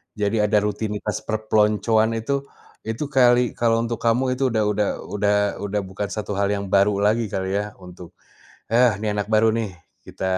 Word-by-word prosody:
Jadi 105 Hz, +1 st, 0 dB
ada 105 Hz, 0 st, +2 dB
rutinitas 105 Hz, 0 st, -3 dB
perpeloncoan 110 Hz, +1 st, +2 dB
itu, 140 Hz, +5 st, -2 dB, 0.4 s
itu 115 Hz, +6 st, -3 dB
kali 125 Hz, -2 st, +4 dB
kalau 115 Hz, -1 st, +1 dB
untuk 115 Hz, 0 st, -3 dB
kamu 115 Hz, +2 st, +2 dB, 0.2 s
itu 135 Hz, -, +2 dB
udah 110 Hz, -3 st, +1 dB
udah 105 Hz, 0 st, 0 dB, 0.3 s
udah 105 Hz, 0 st, +2 dB, 0.3 s
udah 100 Hz, +1 st, -2 dB
bukan 95 Hz, +2 st, -5 dB
1 105 Hz, -1 st, -4 dB
hal 100 Hz, -, +2 dB
yang 100 Hz, 0 st, -4 dB
baru 100 Hz, +1 st, +3 dB
lagi 110 Hz, +2 st, +2 dB
kali 95 Hz, 0 st, -3 dB
ya, 105 Hz, 0 st, -6 dB
untuk, 90 Hz, -2 st, -13 dB, 0.6 s
"Heh, 120 Hz, -2 st, +4 dB
nih, 105 Hz, +1 st, -2 dB
anak 105 Hz, -, -4 dB
baru 110 Hz, 0 st, +3 dB
nih, 115 Hz, -2 st, -1 dB, 0.3 s
kita -, -, -8 dB
105 Hz, 175 wpm, -22 LUFS, 105-115 Hz, 0.6 s, kali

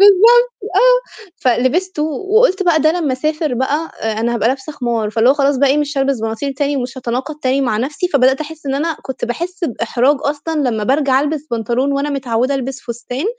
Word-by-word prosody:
بالضبط، 455 Hz, +5 st, +6 dB, 0.2 s
آه، -, -, +2 dB
فلبستُه، 295 Hz, +8 st, 0 dB
وقُلت 385 Hz, -, +2 dB
بقى 335 Hz, -4 st, +3 dB
ده 310 Hz, +1 st, +3 dB
لمّا 320 Hz, -7 st, -1 dB
أسافر 305 Hz, +1 st, -1 dB
بقى 285 Hz, +6 st, -1 dB
أ 220 Hz, 0 st, -2 dB
أنا 235 Hz, +1 st, 0 dB
هابقى 230 Hz, 0 st, +1 dB
لابسة 265 Hz, +3 st, -3 dB
خمار، 235 Hz, -6 st, -2 dB
فاللي 225 Hz, +3 st, +2 dB
هو -, -, +4 dB
خلاص 280 Hz, -1 st, +2 dB
بقى 280 Hz, 0 st, +4 dB
إيه 285 Hz, +2 st, +3 dB
مش 290 Hz, -1 st, -2 dB
هالبِس 270 Hz, -3 st, 0 dB
بناطيل 225 Hz, +5 st, -3 dB
تاني، 285 Hz, +1 st, -1 dB
ومش 250 Hz, 0 st, -4 dB
هاتناقض 255 Hz, +5 st, -3 dB
تاني 265 Hz, +1 st, +1 dB
مع 240 Hz, -5 st, 0 dB
نفسي، 290 Hz, +9 st, -2 dB
فبدأت 265 Hz, -2 st, +3 dB
أحِسّ 310 Hz, -1 st, -8 dB
إن 270 Hz, -, -1 dB
أنا 315 Hz, +2 st, -1 dB
كنت 265 Hz, -1 st, -5 dB
باحِسّ 345 Hz, +9 st, -4 dB
بإحراج 250 Hz, +1 st, +1 dB
أصلًا 295 Hz, -1 st, -1 dB
لمّا 215 Hz, -2 st, -2 dB
بارجع 270 Hz, 0 st, +2 dB
ألبس 300 Hz, 0 st, -2 dB
بنطلون، 240 Hz, +4 st, 0 dB
وأنا 280 Hz, +1 st, -1 dB
متعودة 255 Hz, -1 st, -1 dB
ألبِس 270 Hz, 0 st, -4 dB
فستان، 240 Hz, +5 st, -5 dB
275 Hz, 195 wpm, -17 LUFS, 250-310 Hz, 0.2 s, بالضبط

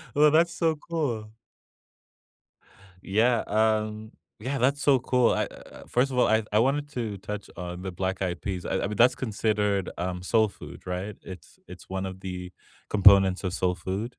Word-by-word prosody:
Well, 150 Hz, +1 st, +6 dB
that's 170 Hz, +2 st, +3 dB
so 165 Hz, -2 st, +1 dB
cool. 130 Hz, -10 st, -3 dB, 1.7 s
Yeah, 115 Hz, +4 st, +2 dB
um 110 Hz, 0 st, 0 dB, 0.3 s
yeah, 135 Hz, +5 st, -3 dB
that's 140 Hz, +4 st, +1 dB
so 135 Hz, -3 st, +4 dB
cool. 125 Hz, -1 st, +2 dB
I -, -, 0 dB
uh, -, -, -13 dB
first 130 Hz, +2 st, +1 dB
of 125 Hz, -, -3 dB
all, -, -, +4 dB
I 110 Hz, 0 st, +3 dB
I 105 Hz, -, +3 dB
wanted 145 Hz, +4 st, +1 dB
to 110 Hz, -5 st, -3 dB
touch 105 Hz, +1 st, -7 dB
on 90 Hz, 0 st, -6 dB
the 95 Hz, -1 st, -5 dB
black-eyed 95 Hz, -1 st, -3 dB
peas. 95 Hz, -3 st, -4 dB
I -, -, -1 dB
I -, -, -1 dB
mean, 105 Hz, -, -4 dB
that's 125 Hz, +2 st, +5 dB
considered, 105 Hz, -4 st, 0 dB
um, 90 Hz, 0 st, -3 dB
soul 110 Hz, +2 st, +3 dB
food, 100 Hz, -, -12 dB
right? 95 Hz, +3 st, -4 dB
It's 95 Hz, -1 st, -12 dB
it's -, -, -12 dB
one 95 Hz, 0 st, -3 dB
of 95 Hz, 0 st, -7 dB
the 90 Hz, -1 st, -6 dB, 0.4 s
components 100 Hz, -2 st, +6 dB
of 90 Hz, -, -2 dB
soul 90 Hz, -1 st, 0 dB
food? 95 Hz, +7 st, -4 dB
105 Hz, 180 wpm, -26 LUFS, 95-125 Hz, 1.7 s, Well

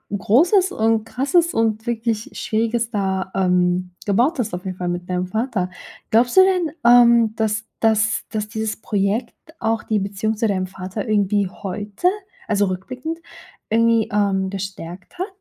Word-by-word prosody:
Großes 350 Hz, -, +3 dB
und 225 Hz, -, +1 dB
Krasses 285 Hz, +9 st, +1 dB
und 225 Hz, -1 st, 0 dB
wirklich 225 Hz, -2 st, -2 dB
Schwieriges 230 Hz, +1 st, -1 dB
da, 190 Hz, -3 st, -1 dB
ähm, 180 Hz, -1 st, +1 dB
gebaut 245 Hz, -, +2 dB
hast, 225 Hz, -7 st, -2 dB
auf 180 Hz, -, -8 dB
jeden 185 Hz, -1 st, -4 dB
Fall, 180 Hz, -1 st, -3 dB
mit 175 Hz, +1 st, -4 dB
deinem 180 Hz, 0 st, -1 dB
Vater. 220 Hz, -3 st, -1 dB, 0.4 s
Glaubst 240 Hz, +9 st, +3 dB
du -, -, +11 dB
denn, 365 Hz, -4 st, +1 dB
ähm, 235 Hz, -2 st, +6 dB
dass 220 Hz, 0 st, -1 dB, 0.2 s
dass 220 Hz, 0 st, +2 dB
dass 215 Hz, -1 st, -3 dB
dieses 220 Hz, 0 st, -3 dB
Projekt 205 Hz, +3 st, -1 dB, 0.3 s
auch 225 Hz, 0 st, 0 dB
die 215 Hz, -2 st, 0 dB
Beziehung 200 Hz, +2 st, -2 dB
zu 225 Hz, -, +1 dB
deinem 185 Hz, -2 st, -1 dB
Vater 190 Hz, +2 st, -6 dB
irgendwie 205 Hz, -1 st, +2 dB
heute, 205 Hz, -, -3 dB, 0.4 s
also 205 Hz, -2 st, +2 dB
rückblickend, 255 Hz, -, -5 dB, 0.5 s
irgendwie, 230 Hz, 0 st, +3 dB
ähm, 195 Hz, -2 st, +1 dB
gestärkt 190 Hz, -, -7 dB
hat? 370 Hz, -, -1 dB
215 Hz, 150 wpm, -21 LUFS, 195-230 Hz, 0.5 s, du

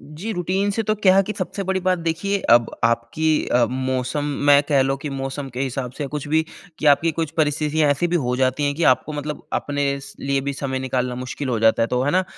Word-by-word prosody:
जी। 155 Hz, +9 st, -7 dB
Routine 190 Hz, +2 st, 0 dB
से 225 Hz, +3 st, -1 dB
तो 215 Hz, 0 st, 0 dB
क्या 195 Hz, -3 st, +4 dB
है 195 Hz, -, +6 dB
कि 215 Hz, -, -4 dB
सबसे 200 Hz, -, -3 dB
बड़ी 190 Hz, 0 st, -1 dB
बात 185 Hz, -1 st, +3 dB
देखिए 170 Hz, +5 st, -1 dB
अब 120 Hz, 0 st, +5 dB
आपकी 115 Hz, +6 st, 0 dB, 0.2 s
अ, 120 Hz, 0 st, +3 dB
मौसम 130 Hz, +2 st, -2 dB, 0.3 s
मैं 145 Hz, 0 st, +7 dB
कह 140 Hz, -3 st, +4 dB
लो 135 Hz, +1 st, 0 dB
कि 145 Hz, +1 st, -6 dB
मौसम 135 Hz, +1 st, -4 dB
के -, -, -2 dB
हिसाब 130 Hz, -1 st, -3 dB
से 145 Hz, -, -2 dB
कुछ 145 Hz, -1 st, -4 dB
भी 160 Hz, +2 st, +3 dB, 0.4 s
कि 155 Hz, -, -2 dB
आपकी 165 Hz, +4 st, -1 dB
कुछ 160 Hz, -2 st, -1 dB
परिस्थितियाँ 150 Hz, 0 st, +1 dB
ऐसी 145 Hz, +5 st, +1 dB
भी 175 Hz, +1 st, 0 dB
हो 125 Hz, 0 st, 0 dB
जाती 130 Hz, +2 st, +1 dB
हैं 145 Hz, 0 st, 0 dB
कि 165 Hz, -, -4 dB
आपको 155 Hz, -, -10 dB
मतलब 150 Hz, 0 st, -5 dB
अपने 140 Hz, -1 st, -1 dB
स 135 Hz, -, -12 dB
लिए 140 Hz, 0 st, 0 dB
भी 140 Hz, +1 st, -3 dB
समय 135 Hz, -1 st, -3 dB
निकालना 125 Hz, -1 st, -2 dB
मुश्किल 130 Hz, +2 st, -5 dB
हो 120 Hz, -3 st, 0 dB
जाता 110 Hz, 0 st, +4 dB
है। -, -, +2 dB
तो 125 Hz, 0 st, 0 dB
है 140 Hz, -, +1 dB
ना, 185 Hz, +3 st, +2 dB
145 Hz, 240 wpm, -22 LUFS, 130-165 Hz, 0.4 s, मैं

